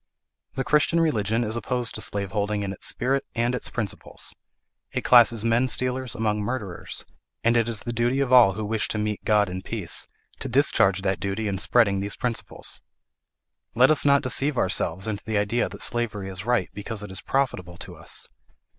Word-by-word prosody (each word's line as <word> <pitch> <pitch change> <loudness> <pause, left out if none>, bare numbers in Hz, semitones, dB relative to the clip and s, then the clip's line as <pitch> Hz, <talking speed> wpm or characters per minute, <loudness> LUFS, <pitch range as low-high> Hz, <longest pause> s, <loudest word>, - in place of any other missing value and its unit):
The 135 - -1
Christian 150 +4 +3
religion 115 -8 +1
is 110 0 -1
opposed 120 0 -1
to 110 - -3
slaveholding 105 +1 -1
in 95 -1 -3
its - - -4
spirit 135 +3 0
and 120 +1 +1
its 125 - -4
principles; 110 -5 -4 0.6
it - - -2
classes 120 -3 +6
menstealers 125 +1 0
among 105 -2 0
murderers; 105 -5 -5 0.4
and 115 +1 +3
it 115 -1 +2
is 110 -3 -2
the 120 - -4
duty 120 +3 +1
of 135 -2 +1
all 120 -6 +8
who 110 +1 -4
wish 110 +1 0
to - - -2
meet 105 -1 -2
God 105 -2 +3
in 90 0 -5
peace, 100 -3 -3 0.3
to - - -4
discharge 95 0 +3
that 95 -2 0
duty 100 +4 -2
in 95 -2 -2
spreading 100 -3 +3
these 100 +1 -2
principles. 120 -2 -4 0.9
Let 130 +5 +6
us 155 - +5
not 140 0 +4
deceive 135 +2 +1
ourselves 95 -1 0
into 105 -2 -3
the 110 -1 -1
idea 105 +4 +1
that - - -4
slavery 105 -5 -1
is 95 +4 -7
right, 120 -6 +1
because 105 +1 -4
it 105 - -8
is 95 - -3
profitable 90 -11 -1
to - - -8
us. - - -5
110 Hz, 185 wpm, -25 LUFS, 100-125 Hz, 0.9 s, all